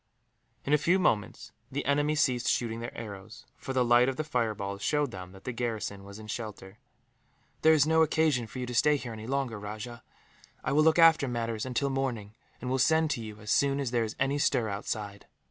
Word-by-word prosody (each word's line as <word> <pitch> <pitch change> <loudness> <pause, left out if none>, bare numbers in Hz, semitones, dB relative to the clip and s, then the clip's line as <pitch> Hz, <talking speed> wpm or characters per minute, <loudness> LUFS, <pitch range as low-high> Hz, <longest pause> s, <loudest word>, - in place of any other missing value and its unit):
In 145 - +1
a 150 - +5
few 175 +5 +3
moments 110 - 0 0.2
the 140 +2 -3
enemy 145 +2 +2
ceased 130 -5 +1
shooting 115 -1 0
their 120 +1 -7
arrows, 105 -1 -9
for - - -7
the 130 -2 +2
light 120 +2 +5
of 135 - -3
the 155 - -2
fireballs 105 -8 -2
showed 145 0 +1
them 90 -2 -8
that 95 0 -15
the 125 - -3
garrison 110 -4 -3
was 100 +1 -10
in 110 - -10
shelter. 105 -3 -7 0.8
"There 160 - +6
is 150 -2 +4
no 160 +1 +3
occasion 155 -6 +2
for 110 - -10
you 125 - -3
to 125 - -6
stay 150 +5 +4
here, 125 -4 -7
any 110 0 -8
longer, 130 -5 -2
Rajah. 110 +3 -7 0.6
I - - -1
will 150 +2 +4
look 160 +1 +4
after 165 -4 +6
matters 115 -1 -3
until 135 +2 -1
morning, 125 -6 -2 0.3
and 125 - -6
will 130 +1 0
send 160 +3 +3
to 120 - -2
you, 110 -1 -9
as 105 - -4
soon 140 0 +2
as 135 -4 -2
there 120 -2 +1
is 110 0 -5
any 135 +2 +1
stir 125 -6 +1
outside." 100 0 -5
120 Hz, 215 wpm, -29 LUFS, 110-140 Hz, 0.8 s, There